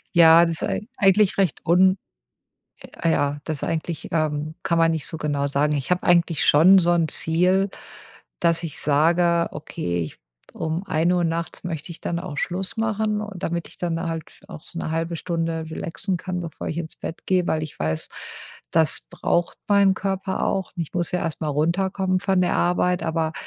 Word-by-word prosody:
Ja, 165 0 +8
das 165 -1 -2
ist - - -3
ei - - -1 0.2
eigentlich 200 -3 +4
recht 195 -3 0
un 185 +3 +5 1.1
äh, 165 - +3
ja, 145 -1 0
das 155 -3 -4
eigentlich, 165 0 -3
ähm 155 -1 -1
kann 170 - +1
man 165 0 +4
nicht 160 -3 -2
so 160 - -5
genau 145 -2 -1
sagen. 145 +2 +1
Ich 140 +1 -3
habe 180 - +1
eigentlich 170 -3 +3
schon 175 +7 +7
so 175 0 +2
'n 165 -2 +2
Ziel, 180 +6 +2 0.7
dass 170 -1 +2
ich 160 - -4
sage: 170 +3 +3
„Okay, 145 - -4
ich 75 - -9 0.3
um 165 +2 -3
1:00 175 +1 +1
nachts 165 0 -3
möchte 165 -1 -5
ich 165 - -12
dann 170 0 -2
auch 150 -5 -7
Schluss 185 +4 -1
machen“ 220 -1 0
und 205 -4 -7
damit 170 0 -2
ich - - -16
dann 170 -2 -2
halt 165 -2 -6
auch - - -9
so - - -11
'ne 160 - -3
0,5 165 +1 -2
Stunde 165 -1 -2
relaxen 180 +4 -3
kann, 180 +1 -4
bevor 165 -3 -6
ich 160 - -3
ins 170 -2 -5
Bett 165 - -7
gehe, 185 -2 +1
weil 155 0 0
ich 155 - -9
weiß, 80 +1 -2 0.6
das 160 -1 +2
braucht 170 -1 -1
meinen 200 -1 +5
Körper 195 -1 -2
auch. 190 -1 -1
Ich 165 -3 -4
muss 175 -2 0
ja 180 - 0
erst 165 -2 -4
mal 155 - -1
runterkommen 185 +5 0
von 190 -2 +1
der 180 - +1
Arbeit, 180 +1 +1
aber 160 -1 -1
170 Hz, 190 wpm, -23 LUFS, 160-180 Hz, 1.1 s, Ja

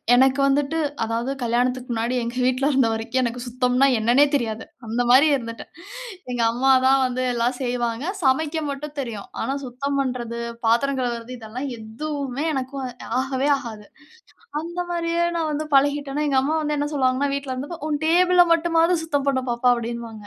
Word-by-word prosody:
எனக்கு 265 +2 +4
வந்துட்டு 285 +3 +1 0.3
அதாவது 230 +4 -2
கல்யாணத்துக்கு 250 +2 0
முன்னாடி 235 +2 -1
எங்க 235 +1 -4
வீட்ல 255 +2 +1
இருந்த 260 -3 +3
வரைக்கும் 230 +3 -1
எனக்கு 240 +1 -2
சுத்தம்னா 250 +2 +2
என்னன்னே 240 +6 +5
தெரியாது 225 -4 -2 0.2
அந்த 230 +2 0
மாரி 270 +5 +7
இருந்துட்டேன். 230 -3 -7 0.6
எங்க 245 -1 -1
அம்மா 265 +3 +2
தான் 270 +1 +5
வந்து 255 0 -2
எல்லாம் 240 +1 0
செய்வாங்க. 245 +1 -2 0.2
சமைக்க 310 +4 +1
மட்டும் 285 +1 -6
தெரியும். 230 -7 -5
ஆனா 270 - -1
சுத்தம் 275 +3 -3
பண்றது, 245 -3 -2 0.3
பாத்திரம் 265 +5 +2
கழுவுறது, 240 -1 -3
இதெல்லாம் 240 +5 -6
எதுவுமே 275 +4 -4
எனக்கும் 265 0 -3 0.4
ஆகவே 265 +1 -1
ஆகாது. 220 -5 -8 0.8
அந்த 345 +2 -5
மாரியே 340 0 0
நான் 315 -2 -1
வந்து 305 +1 -2
பழகிட்டேன்னா 285 +1 +1
எங்க 270 -2 +2
அம்மா 305 +4 0
வந்து 300 0 -1
என்ன 290 0 -1
சொல்லுவாங்கன்னா 265 +1 +1
வீட்ல 280 -2 -3
இருந்த 270 +5 -6
போது 310 - -9
"உன் 295 -1 -1
டேபிள 360 +1 +5
மட்டுமாவது 335 +1 +2
சுத்தம் 285 -3 -1
பண்ணு 260 -2 +1
பாப்பா" 240 +1 +2
அப்டின்னுவாங்க 230 -2 -6
260 Hz, 165 wpm, -23 LUFS, 240-285 Hz, 0.8 s, மாரி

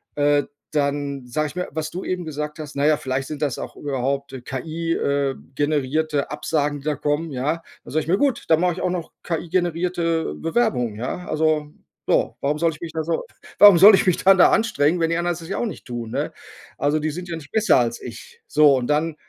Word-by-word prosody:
Äh, 145 -1 +3 0.3
dann 140 -2 -1
sage 155 +5 -1
ich - - -13
mir, 180 - -2
was 155 0 -4
du 185 - -5
eben 180 -1 -3
gesagt 150 0 -5
hast: 150 -1 -8
„Na 140 +1 +1
ja, 155 - +4
vielleicht 130 0 -3
sind 150 -1 -6
das 140 -5 -1
auch - - -7
überhaupt, 140 0 -2
äh, 130 - -7
KI, 160 +7 -3
äh, 140 -1 0 0.2
generierte 145 +1 0
Absagen, 145 -2 -1
die 135 - -16
da 150 -1 0
kommen“, 150 +3 -1
ja? 150 +6 -1 0.2
Dann - - -11
sage 155 - +2
ich - - -13
mir: 190 - +4
„Gut, 275 -2 0
dann 160 - +5
mache 180 -1 +2
ich 180 - -7
auch 180 - 0
noch 175 -3 -4
KI-generierte 170 - -1
Bewerbung, 160 - 0
ja.“ 130 +10 -5
Also, 155 -1 0 0.4
so. - - +1
Warum 145 +2 0
soll 165 0 +2
ich 155 - -12
mich 165 - -6
da 160 - -2
so 165 +1 -1 0.4
warum 205 -3 +10
soll 205 +5 +9
ich - - +1
mich 180 - +3
dann 195 0 +7
da - - +8
anstrengen, 175 -7 +2
wenn 165 - +1
die 165 - +1
anderen 175 -1 -1
das 165 - -10
ja - - -2
auch - - 0
nicht 180 - -8
tun, 120 -2 -5
ne? - - -2 0.5
Also, 145 +2 +2
die 155 0 -1
sind 175 +2 -7
ja 165 - -3
nicht 145 -2 -12
besser 220 0 +4
als 120 -1 -1
ich, 120 - -10
so 150 -2 +5
und 125 -2 -1
dann 150 +2 0
155 Hz, 230 wpm, -22 LUFS, 140-170 Hz, 0.5 s, warum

